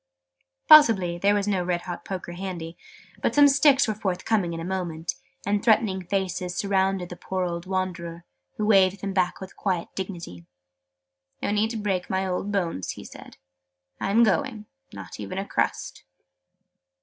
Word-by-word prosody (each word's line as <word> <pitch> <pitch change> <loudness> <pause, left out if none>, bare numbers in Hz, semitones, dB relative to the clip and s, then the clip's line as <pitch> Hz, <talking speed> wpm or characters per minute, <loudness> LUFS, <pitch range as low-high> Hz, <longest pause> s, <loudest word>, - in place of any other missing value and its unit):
Possibly 210 - +7
there 200 +3 +3
was 205 0 0
no 190 -3 +1
red 175 -1 -1
hot 175 -2 -6
poker 185 -3 -6
handy: 175 -2 -6 0.5
but - - 0
some 290 0 +8
sticks 280 -1 +5
were 215 - 0
forthcoming 195 -1 -1
in 165 - -5
a 165 - -5
moment, 175 -3 -3 0.3
and 205 0 +1
threatening 215 -4 +3
faces 185 -2 -2
surrounded 195 -2 0
the 175 - -7
poor 185 +1 -3
old 170 0 -4
wanderer, 175 -3 -3 0.3
who 210 - -1
waved 195 -2 +4
them 195 -1 -3
back 185 -2 0
with 190 0 -9
quiet 185 -4 -2
dignity. 170 - -7 1.0
"No - - 0
need 210 +1 +1
to 230 - -4
break 195 -4 -2
my 190 0 0
old 190 +2 -2
bones," 170 - -2
he - - -10
said. - - -12 0.6
"I - - -2
am 225 +4 +5
going. 225 0 0 0.3
Not - - -9
even 185 - -6
a 195 - -2
crust!" - - -2
190 Hz, 165 wpm, -25 LUFS, 180-205 Hz, 1.0 s, some